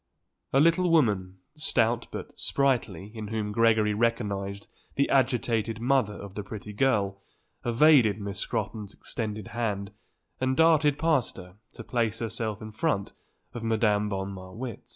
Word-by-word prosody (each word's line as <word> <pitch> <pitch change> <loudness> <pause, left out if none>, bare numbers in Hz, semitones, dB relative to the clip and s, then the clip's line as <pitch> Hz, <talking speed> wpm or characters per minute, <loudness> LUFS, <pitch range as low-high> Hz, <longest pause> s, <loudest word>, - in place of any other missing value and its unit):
A 135 - +4
little 170 +4 +4
woman, 105 - +2 0.2
stout 120 -6 +1
but - - -7
sprightly, 115 -8 0
in 110 -2 -6
whom 105 -1 -2
Gregory 110 -1 +3
recognized 100 -3 -1 0.3
the 140 - +2
agitated 115 -4 +1
mother 120 -4 +1
of 100 -1 -9
the 105 - -4
pretty 105 0 -8
girl, 100 -5 +1 0.4
evaded 120 -4 +5
Miss 100 -1 -5
Scrotton's 105 0 -3
extended 110 -3 -5
hand 105 -4 -2 0.5
and 130 0 0
darted 155 -3 +4
past 150 -6 +1
her 90 +1 -11 0.2
to 115 - -9
place 115 -2 0
herself 110 -2 -3
in 110 - -7
front 110 -3 -1 0.4
of 120 - -6
Madame 105 -2 +2
von 95 0 -3
Marwitz. 95 +6 -8
110 Hz, 140 wpm, -27 LUFS, 100-125 Hz, 0.5 s, evaded